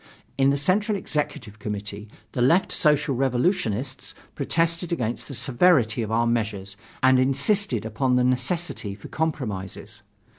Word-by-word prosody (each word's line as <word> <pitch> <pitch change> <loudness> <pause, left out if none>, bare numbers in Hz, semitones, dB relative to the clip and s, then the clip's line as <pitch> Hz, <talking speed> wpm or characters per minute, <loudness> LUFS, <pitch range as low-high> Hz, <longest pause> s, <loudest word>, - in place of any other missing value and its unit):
In 135 0 +3
the 140 - +2
Central 200 +8 +1
Executive 125 - -4
Committee, 105 0 -5 0.2
the 125 - -2
Left 165 +10 +3
Social 150 -2 +2
Revolutionists 130 - -1 0.2
protested 165 +1 0
against 120 -8 -2
the 140 - -6
severity 125 -2 +3
of 110 - -3
our 115 +1 +2
measures 105 -4 -2 0.3
and 130 0 +6
insisted 135 - +1
upon 125 +4 0
the 125 - +3
necessity 125 - -1
for 100 - -12
compromises. 105 - -4
130 Hz, 135 wpm, -24 LUFS, 110-150 Hz, 0.3 s, and